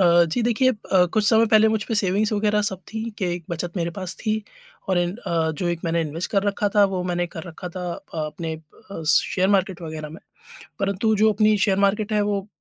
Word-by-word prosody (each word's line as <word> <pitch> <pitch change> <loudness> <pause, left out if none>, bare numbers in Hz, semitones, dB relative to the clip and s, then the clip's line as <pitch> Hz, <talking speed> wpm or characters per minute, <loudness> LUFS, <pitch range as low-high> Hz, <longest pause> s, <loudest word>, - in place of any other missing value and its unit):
अ, 175 -1 +6
जी 245 - +1
देखिए 240 +3 +3
अ, 190 -5 +2
कुछ 215 -1 +2
समय 225 0 +5
पहले 215 0 +5
मुझपे 220 +1 -1
सेविंग़्स 205 +2 +1
वग़ैरह 210 0 +1
सब 190 -2 -2
थीं 225 +1 -4
कि 190 - -1
एक 175 -2 -8
बचत 170 +2 -4
मेरे 170 -1 -1
पास 185 -2 -4
थी 215 -1 -1 0.5
और 185 -2 +2
एन 175 +2 0
अ, 165 -8 -1
जो 175 +3 -3
एक 170 -1 -2
मैंने 165 0 +1
इन्वेस्ट 160 +2 -3
कर 200 -2 +2
रखा 205 +1 0
था 205 -1 +6
वो 180 - -1
मैंने 175 -1 -1
कर 165 - -5
रखा 180 +1 -8
था 180 - -4
अ, 165 - -9
अपने 160 +1 -5 0.4
अ, 165 - -6
शेयर 185 +5 +3
मार्केट 190 -2 0
वग़ैरह 155 -1 -6
में। 160 +4 -11 0.6
परंतु 200 +3 +1
जो 220 0 +6
अपनी 215 +1 +3
शेयर 195 -2 +1
मार्केट 210 +2 0
है 210 - +3
वो 200 0 -2
190 Hz, 225 wpm, -23 LUFS, 170-215 Hz, 0.6 s, अ